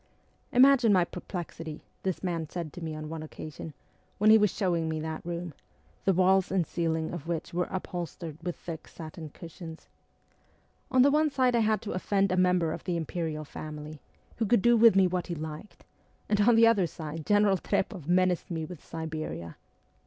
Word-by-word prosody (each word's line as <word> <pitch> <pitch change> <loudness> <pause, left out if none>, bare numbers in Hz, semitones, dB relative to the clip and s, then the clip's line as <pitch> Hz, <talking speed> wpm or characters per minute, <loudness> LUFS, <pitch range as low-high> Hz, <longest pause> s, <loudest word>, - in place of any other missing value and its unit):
Imagine 255 -3 +6
my 180 -3 +4
perplexity,' 165 -3 -7 0.2
this 190 -1 -2
man 165 -4 -2
said 170 -4 -5
to 175 - -9
me 160 -1 -4
on 155 0 -6
one 160 0 -5
occasion, 155 0 -8 0.4
when 215 +1 +5
he 220 - +9
was 210 -1 +4
showing 170 -5 0
me 160 0 -2
that 160 0 -5
room, 170 -1 -5 0.5
the 195 - +5
walls 185 +1 +3
and 185 -3 +2
ceiling 160 -1 -1
of 165 -2 -6
which 170 0 -3
were 175 +1 0
upholstered 175 -3 -5
with 175 0 -3
thick 165 -2 -8
satin 160 -1 -9
cushions. 165 +1 -10 0.5
' - - -38
On 255 -1 +6
the 280 - +5
one 305 +1 +3
side 260 -3 +2
I - - +4
had 220 -1 +1
to 215 - -4
offend 195 +1 +1
a - - +2
member 180 -3 +3
of - - -5
the 175 -2 -1
Imperial 160 -1 -3
Family, 150 0 -8 0.4
who 225 - 0
could 235 -2 +3
do 240 0 +6
with 230 -3 +7
me 195 -1 +6
what 180 0 -1
he 175 - -3
liked, 155 +5 -8 0.4
and 210 -1 +2
on 235 +3 +5
the 230 0 +7
other 210 -6 +4
side 160 -1 -7
General 205 +1 +4
Trpoff 185 -2 -2
menaced 180 0 +2
me 165 -2 -3
with 170 -1 -10
Siberia 155 - -5
175 Hz, 190 wpm, -29 LUFS, 160-195 Hz, 0.5 s, he